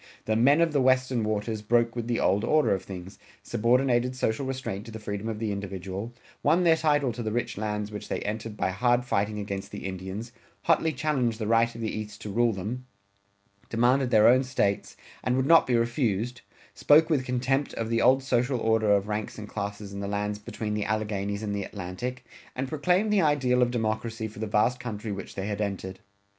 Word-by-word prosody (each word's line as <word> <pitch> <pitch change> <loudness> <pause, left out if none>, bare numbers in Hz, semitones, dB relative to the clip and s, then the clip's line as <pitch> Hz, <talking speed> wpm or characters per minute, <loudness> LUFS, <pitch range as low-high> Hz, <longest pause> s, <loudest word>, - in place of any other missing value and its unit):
The 110 - +1
"men 140 +8 +5
of 165 -2 +2
the 140 - +3
Western 130 -2 +2
Waters" 110 0 -2
broke 115 +2 +2
with 120 -1 -3
the 120 -1 0
old 100 +2 +2
order 155 +2 +3
of 95 - -1
things, 95 -1 -9 0.2
subordinated 125 +2 +2
social 130 +1 -1
restraint 130 -7 -4
to - - -8
the 110 - -6
freedom 105 0 -4
of 110 - -3
the 110 -1 -2
individual, 100 +2 -5 0.3
won 165 +5 +3
their 165 -2 +6
title 145 -5 +1
to 120 - -5
the 110 -2 -2
rich 120 0 -2
lands 105 0 -3
which 105 - -7
they - - -1
entered 110 0 -4
by 95 - 0
hard 120 +5 +2
fighting 105 -2 0
against 100 -1 -4
the 100 - -7
Indians, 95 +5 -5 0.3
hotly 165 -1 +3
challenged 130 -5 0
the 110 - -3
right 115 +1 +2
of 115 - -7
the 110 - -1
East 105 -1 -6
to 105 - -5
rule 120 +3 +3
them, 110 +6 -5 0.8
demanded 125 +3 +2
their 110 -3 +6
own 130 +2 +6
States, 125 -6 -1 0.3
and 125 - +1
would 130 - +1
not 165 +3 +6
be 125 - +2
refused, 120 0 0 0.3
spoke 155 +2 +5
with 140 -5 +2
contempt 130 +3 0
of 115 0 -3
the 115 0 +2
old 130 +1 +4
social 125 0 +1
order 110 -2 +2
of 100 0 +1
ranks 105 0 -3
and 105 -1 -7
classes 100 -1 -5
in 100 - -5
the 100 - -3
lands 105 +1 -2
between 105 +1 -4
the 105 -1 -1
Alleghanies 105 -1 -2
and 105 -1 -2
the 100 - -2
Atlantic, 105 +8 -6 0.3
and 130 +1 -2
proclaimed 180 +9 +1
the 200 - +4
ideal 135 -5 +2
of 125 - +4
democracy 110 -1 -2
for 105 - -12
the 110 - -2
vast 115 +4 +2
country 110 -3 -5
which 100 -1 -6
they 95 - -3
had 105 0 -3
entered. 95 -2 -4
115 Hz, 210 wpm, -27 LUFS, 105-125 Hz, 0.8 s, their